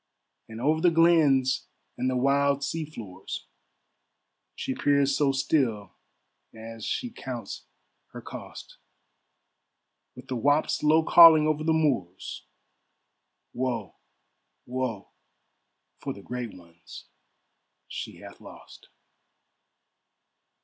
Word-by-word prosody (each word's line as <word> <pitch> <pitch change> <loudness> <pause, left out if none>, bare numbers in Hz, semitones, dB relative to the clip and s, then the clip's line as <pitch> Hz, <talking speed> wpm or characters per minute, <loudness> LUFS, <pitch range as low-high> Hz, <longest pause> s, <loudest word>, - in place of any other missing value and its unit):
And 110 0 -8
over 155 +5 +1
the 175 - +5
glens 160 -6 +3 0.3
and 130 +1 -1
the 130 - -1
wild 140 +2 +2
sea 160 +3 -3
floors 115 -11 -8 1.1
She 130 - -3
peers 140 0 +2
so 140 -1 +2
still 130 - 0 0.6
as 115 0 -9
she 245 - -3
counts 125 - -7 0.4
her - - -10
cost, - - -10 1.4
With 125 +1 -12
the 130 - -3
whaups 145 +5 +1
low 155 +2 +4
calling 160 -2 +8
over 155 0 0
the 160 - +1
moors, 135 - -1 1.1
"Woe, 120 -7 -3 0.7
woe, 125 -5 -4 0.9
for - - -5
the 100 - -13
great 125 -3 -6
ones 85 -1 -14 0.8
she - - -7
hath - - -13
lost." - - -14
135 Hz, 100 wpm, -27 LUFS, 115-155 Hz, 1.4 s, calling